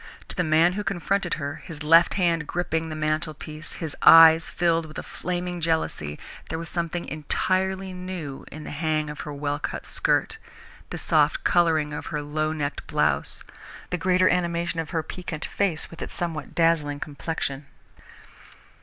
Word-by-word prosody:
To - - -7
the 180 - +1
man 160 +2 +4
who 210 +2 -3
confronted 195 -1 -1
her, 145 +2 -4
his 155 -4 -9
left 165 +2 +6
hand 170 -5 +1
gripping 165 -2 -1
the 155 - -5
mantelpiece, 155 0 -3
his 160 -4 -4
eyes 165 0 +9
filled 165 -2 +1
with 155 - -11
a - - -4
flaming 180 0 -4
jealousy, 155 - -1 0.3
there 160 - -2
was 165 0 -4
something 170 0 -2
entirely 190 +5 -1
new 180 -7 -6
in 155 - -8
the - - -7
hang 155 0 -1
of 150 - -10
her 150 - -5
well 145 0 -2
cut - - -4
skirt, 450 -2 0 0.5
the - - -5
soft - - +2
colouring 160 -4 +2
of - - -5
her 150 -1 -3
low 155 +1 -1
necked 145 -2 -4
blouse, - - 0 0.5
the 180 - 0
greater 185 0 +4
animation 170 -2 0
of 160 -2 -3
her 160 -1 -1
piquant 165 -1 -5
face 185 -6 -1
with 165 - -11
its - - -5
somewhat 165 -3 -4
dazzling 160 -4 +2
complexion. 145 -2 -4
165 Hz, 165 wpm, -25 LUFS, 155-175 Hz, 0.5 s, eyes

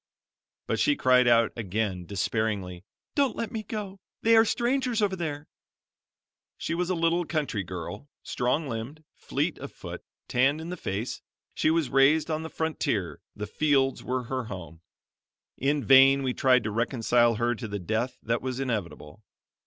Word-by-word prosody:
But - - -1
she 290 - +3
cried 125 - +4
out 115 -2 +4
again 100 -4 -2
despairingly: 100 -3 -2 0.3
"Don't 280 -4 +1
let 230 - -3
me 225 -3 -3
go; 205 -2 -6 0.2
they 230 0 +5
are 225 0 +7
strangers 245 +1 0
over 200 -3 +1
there." 155 -4 -4 1.1
She - - -3
was 175 +1 -1
a 185 - +1
little 165 +1 +2
country 155 - -2
girl, 95 - -7
strong 135 +5 -1
limbed, 130 +6 -6
fleet - - -2
of - - -7
foot, - - -8 0.3
tanned 135 +5 +2
in 160 +1 -6
the 180 - -3
face; 105 - -4 0.3
she - - +1
was 160 -6 +1
raised 145 +4 +4
on 155 0 -1
the 160 - -6
frontier, 135 - -2
the 105 - -4
fields 135 +3 +1
were 130 0 -2
her 130 +1 -3
home. 90 -5 -8 0.7
In 140 +1 0
vain 135 +1 +7
we 130 -1 0
tried 125 -2 +3
to 110 - -2
reconcile 120 +1 +2
her 120 +2 +1
to 115 0 -6
the 100 -1 -4
death 110 +7 -2
that 115 +1 0
was 130 0 -3
inevitable. 105 - -4
130 Hz, 165 wpm, -27 LUFS, 110-160 Hz, 1.1 s, are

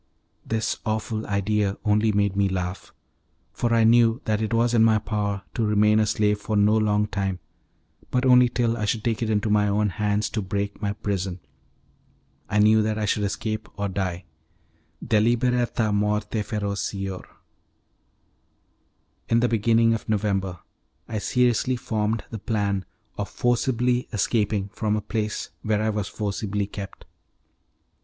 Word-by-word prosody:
This 110 0 -1
awful 110 0 -2
idea 100 0 0
only 105 +1 +3
made 100 -1 +1
me 100 -1 +2
laugh, 90 0 -4 0.6
for 120 - -1
I 115 -1 +4
knew 115 +1 +5
that 110 0 0
it 110 - -2
was 115 +1 +2
in 115 -2 +5
my 110 -1 +5
power 105 -2 -2
to 115 - -1
remain 105 0 +3
a 110 - +2
slave 105 -1 +1
for 105 +1 -3
no 105 +1 +4
long 105 -1 +2
time, 95 -2 -2 0.7
but 125 +1 0
only 125 -1 +6
till 120 -1 0
I 105 - -1
should 110 +1 -1
take 115 -1 -1
it 115 - -1
into 105 0 +1
my 105 0 +3
own 105 +1 +1
hands 105 +2 0
to 110 - -2
break 100 +1 -3
my 100 -1 -1
prison. 95 -3 -3 1.1
I 105 - 0
knew 110 +1 +5
that 110 0 -1
I 105 - -1
should 105 +1 0
escape 110 +2 -3
or 100 0 -1
die: 95 -2 -3 0.8
'Deliberata 120 0 +2
morte 105 +1 0
ferocior'. 100 -3 -3 2.0
In 115 - +4
the 120 - +3
beginning 115 0 +3
of 115 - -4
November 95 -4 -1 0.5
I 110 -2 -3
seriously 125 +2 +1
formed 110 -2 -1
the 110 - -5
plan 100 -3 -1 0.3
of 105 - -2
forcibly 125 0 0
escaping 105 -2 0
from 105 0 -1
a 105 - -1
place 105 0 -3
where 105 0 0
I 110 - +1
was 105 -2 -2
forcibly 105 -1 -2
kept. 100 0 -9
105 Hz, 150 wpm, -24 LUFS, 100-115 Hz, 2.0 s, only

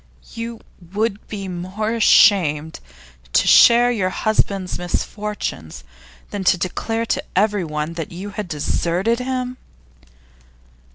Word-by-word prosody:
'You 230 0 -6 0.3
would 210 0 -2
be 200 -2 -6
more 185 +5 -4
ashamed 160 -9 +4 0.5
to - - +4
share 240 +1 +7
your 195 -6 0
husband's 195 -2 -1
misfortunes 175 - -4 0.5
than 200 -2 -4
to 180 - +4
declare 225 +6 -2
to - - -1
everyone 170 -6 0
that 165 -2 -6
you 190 +4 -7
had 205 -1 -5
deserted 175 - -1
him? 255 0 -3
200 Hz, 110 wpm, -20 LUFS, 175-225 Hz, 0.5 s, share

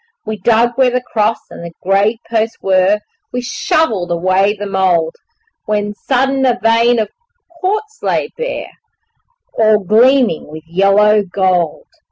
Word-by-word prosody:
We 220 0 -4
dug 230 +4 +3
where 260 -1 +5
the 250 0 0
cross 220 0 +1
and - - -10
the 170 0 -8
grave 200 +4 +2
posts 225 0 -1
were, 190 +2 +2 0.3
We 250 - -3
shovelled 235 - -1
away 185 +4 +1
the 205 - -5
mould, 185 -4 +1 0.5
When 210 -1 -1
sudden 265 +4 0
a 250 -2 +2
vein 230 +2 +3
of 215 -2 -1 0.5
quartz 425 +5 -2
lay - - -1
bare - - -4 0.9
All 215 -1 +5
gleaming 230 - +2
with 155 +1 -10
yellow 195 +5 +3
gold. 185 -4 -1
210 Hz, 140 wpm, -15 LUFS, 190-240 Hz, 0.9 s, where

